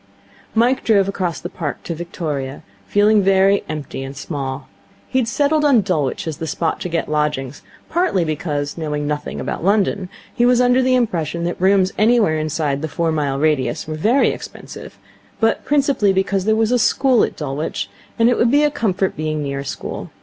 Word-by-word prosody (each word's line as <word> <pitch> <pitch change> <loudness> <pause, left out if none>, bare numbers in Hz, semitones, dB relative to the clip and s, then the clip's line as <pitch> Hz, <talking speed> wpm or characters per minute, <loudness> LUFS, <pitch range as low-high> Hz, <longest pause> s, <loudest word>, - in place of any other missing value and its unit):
Mike 245 +4 +2
drove 200 -4 +3
across 185 -4 -2
the - - -5
Park 170 -5 -5
to 170 - -4
Victoria, 155 -5 -5 0.2
feeling 210 +1 +4
very 195 +1 +3
empty 150 -3 -5
and 135 +1 -7
small. 135 -2 -5 0.4
He 260 - +1
had 240 - 0
settled 290 +5 +1
on 275 -6 +5
Dulwich 160 -9 -1
as 155 -3 -4
the 160 - -5
spot 165 +1 -1
to 180 - -4
get 165 -1 -1
lodgings, 150 -3 -2 0.3
partly 335 - +1
because, 150 -1 -3
knowing 150 -2 -2
nothing 150 0 -3
about - - -4
London, 200 -1 +1 0.2
he 240 - +1
was 245 0 +4
under 250 +1 +4
the 255 0 +3
impression 170 - -1
that 175 +1 -3
rooms 190 0 +4
anywhere 215 -8 +3
inside 155 -2 -1
the 160 - -2
four 165 0 -1
mile 145 -3 -1
radius 140 -5 0
were 155 - -4
very 220 - +3
expensive, - - -8 0.4
but 225 0 +1
principally 275 -8 +2
because 190 0 0
there 220 0 +3
was 220 +1 +1
a 250 - +3
school 255 +1 +3
at - - -2
Dulwich, 145 +1 -3 0.3
and 230 - +4
it 245 - +2
would 230 - +4
be 290 +4 +4
a 295 - +3
comfort 195 -7 -1
being 155 -1 -2
near 140 -1 -3
a 140 - -6
school. - - -6
180 Hz, 190 wpm, -19 LUFS, 150-225 Hz, 0.4 s, on